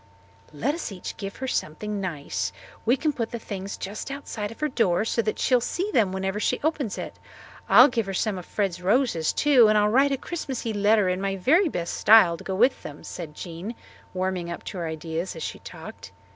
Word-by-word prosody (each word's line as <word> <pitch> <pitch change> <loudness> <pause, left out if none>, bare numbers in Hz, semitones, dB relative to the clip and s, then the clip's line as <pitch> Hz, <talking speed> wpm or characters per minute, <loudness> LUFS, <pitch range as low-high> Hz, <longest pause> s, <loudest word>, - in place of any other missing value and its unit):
"Let 225 - -1
us 330 -8 -5
each 185 -2 -7
give 195 -1 -6
her 265 - -5
something 210 +1 -2
nice. 160 -7 -3 0.4
We 245 +4 +4
can 300 +1 0
put 230 -4 -2
the 235 - -4
things 200 -3 -6
just 205 +6 -6
outside 260 -7 -5
of 230 - -12
her 305 - +1
door 220 -8 +1
so 230 - +1
that 215 -1 -2
she - - 0
will 250 - +5
see 370 - -2
them 215 - +3
whenever 190 +2 -2
she - - 0
opens 290 -8 -1
it. - - -7 0.5
I'll 250 - +9
give 230 -6 -1
her 195 - -3
some 200 -1 0
of 175 - -11
Fred's 190 -4 -2
roses 200 - +2
too, 270 -6 +5
and 215 0 +4
I'll 210 0 +4
write 270 +5 +4
a 275 - +1
Christmassy 260 -8 -4
letter 205 0 +3
in 185 +1 0
my 195 0 -1
very 315 - +3
best 170 - -3
style 210 -6 +6
to - - -11
go 190 - -3
with 245 +7 +3
them," 145 - -9
said 160 -4 -7
Jean, 175 +8 -6 0.4
warming 185 -2 -2
up 170 - -6
to 185 - -6
her 170 - -2
ideas 160 +3 -4
as 160 - -6
she - - -5
talked. - - -10
210 Hz, 220 wpm, -25 LUFS, 185-250 Hz, 0.5 s, I'll